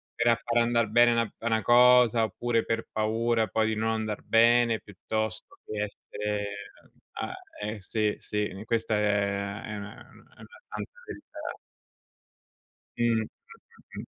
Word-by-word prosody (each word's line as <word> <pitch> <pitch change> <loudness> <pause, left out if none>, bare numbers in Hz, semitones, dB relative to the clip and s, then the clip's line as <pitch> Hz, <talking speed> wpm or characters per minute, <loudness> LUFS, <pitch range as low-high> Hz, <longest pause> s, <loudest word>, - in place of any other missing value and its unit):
per 120 - +1
a 115 - +6
far 120 0 +2
andar 115 -1 +1
bene 120 +2 +5
na 115 -2 0
una 110 -1 0
cosa 120 -1 +6
oppure 115 +3 0
per 115 0 -2
paura 110 +1 +1
poi 110 +3 +1
di 110 - 0
non 110 +1 0
andar 110 -1 -2
bene 115 0 +4
piuttosto 110 +1 -5
che 105 -1 -3
essere 105 0 -5 0.5
a - - -3 0.3
eh, 105 +1 -4
sì, 105 +2 0
sì, 105 0 -2
n 100 +3 -9
questa 115 -1 0
è 100 0 0
è 110 - -6
una 100 0 -7 0.2
una - - -18
è - - -23
una - - -14
santa - - -6 0.2
verità. 305 -6 -8 1.4
Mh, - - +2 0.2
mh, - - -2
mh, - - -15
mh. - - -10
110 Hz, 155 wpm, -28 LUFS, 105-115 Hz, 1.4 s, a